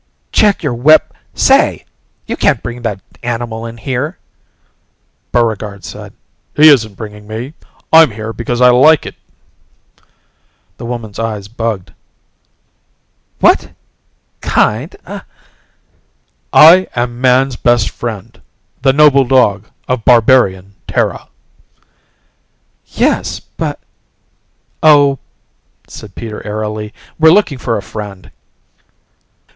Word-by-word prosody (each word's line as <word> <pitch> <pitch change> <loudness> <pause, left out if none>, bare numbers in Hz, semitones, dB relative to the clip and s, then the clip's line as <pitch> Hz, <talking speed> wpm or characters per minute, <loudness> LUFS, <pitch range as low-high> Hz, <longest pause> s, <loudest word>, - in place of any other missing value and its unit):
"Check 205 -4 +2
your 145 -5 -1
weap... 145 +7 +5 0.3
say! - - +2 0.4
You - - -4
can't - - +1
bring 120 0 -6
that 115 -4 -4 0.2
animal 115 -1 -4
in 115 0 -10
here!" 135 +8 -4 1.1
Buregarde 110 -4 -1
said, - - -10 0.4
"He 155 +1 +7
isn't 110 -8 +3
bringing 105 0 -10
me. 115 +7 -6 0.4
I'm 160 -2 +7
here 110 +1 -7
because 120 +2 -3
I 125 0 +7
like 150 +5 +4
it." - - -7 1.6
The 115 - -8
woman's 115 -4 -6
eyes 110 -3 -4
bugged. 110 -4 -4 1.5
"What... - - +3 0.7
kind - - 0 0.8
?" - - -44
"I 175 +4 +7
am 120 0 -3
man's 130 0 +2
best 120 -3 +1
friend 110 -5 -7 0.4
the 135 0 +3
noble 140 -2 +5
dog 110 -5 +2 0.2
of 125 -3 -2
Barbarian 110 -6 +3
Terra." - - -2 1.6
"Yes... - - -1
but - - -6 0.6
" - - -47 0.2
"Oh," 145 -3 +4 0.7
said 105 -4 -12
Peter 110 -2 -7
airily, 105 0 -5 0.3
"we're 160 0 +6
looking 165 -7 +2
for 115 -2 -2
a 100 - -6
friend." 100 -4 -9
120 Hz, 110 wpm, -14 LUFS, 110-135 Hz, 1.6 s, He